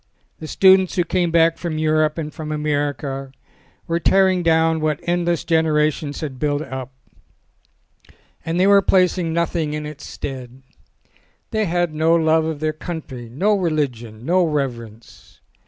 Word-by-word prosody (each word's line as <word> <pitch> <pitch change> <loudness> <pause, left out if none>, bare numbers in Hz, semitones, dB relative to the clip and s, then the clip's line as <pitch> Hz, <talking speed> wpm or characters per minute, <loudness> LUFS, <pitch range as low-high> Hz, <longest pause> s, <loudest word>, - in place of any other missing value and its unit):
The 155 - -7
students 190 +1 +4
who 175 - +2
came 175 0 0
back 165 0 +3
from 165 -3 -3
Europe 155 0 +1
and 155 -2 -5
from 155 -1 -6
America 145 -2 -2 0.5
were 170 0 -1
tearing 190 0 +3
down 160 -1 +2
what 155 -1 0
endless 175 -1 0
genera 155 -2 +2
tions 145 -1 -7
had 140 -5 -6
built 145 0 0
up, 130 -3 -7 1.5
and 165 +2 -2
they 185 - +4
were 200 0 +6
placing 180 -2 +2
nothing 165 -2 -1
in 150 0 -5
its 150 -1 -9
stead. 130 -1 -8 0.9
They 220 -2 0
had 175 -2 0
no 160 +2 +3
love 160 -1 +2
of 160 -2 -4
their 155 0 0
country, 150 -7 -7
no 190 - +1
religion, 130 - -2
no 180 +3 +3
reverence. 120 -8 -5
155 Hz, 150 wpm, -20 LUFS, 145-170 Hz, 1.5 s, were